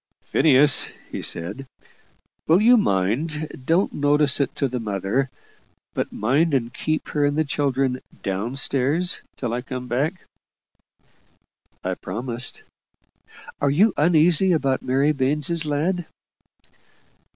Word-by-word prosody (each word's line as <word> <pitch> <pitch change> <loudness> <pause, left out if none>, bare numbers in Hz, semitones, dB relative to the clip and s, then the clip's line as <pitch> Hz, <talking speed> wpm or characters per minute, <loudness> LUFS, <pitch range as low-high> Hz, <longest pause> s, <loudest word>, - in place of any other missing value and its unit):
"Phineas," 145 -2 +4 0.2
he - - -4
said, 130 +11 -2 0.8
"will 165 +3 +5
you 235 +4 +6
mind 150 - 0
don't 165 +8 +1
notice 145 -1 +2
it 140 - -1
to 140 - 0
the 125 0 -4
mother 105 +5 -1 0.6
but - - -3
mind 140 +8 +1
and 120 -2 -1
keep 155 0 -2
her 150 - 0
and 145 +1 +1
the 155 - +3
children 135 -3 -1 0.2
down 100 +6 -3
stairs 140 +6 +1 0.2
till 120 -3 -3
I 120 - -2
come 125 0 -6
back?" 140 +9 -1 1.7
I - - -1
promised. 120 +5 -5 1.0
"Are 145 - +2
you 190 +9 +3
uneasy 170 +3 +3
about 135 -4 0
Mary 135 +4 +1
Baines's 150 +4 0
lad?" 165 +4 -1
140 Hz, 120 wpm, -23 LUFS, 125-155 Hz, 1.7 s, you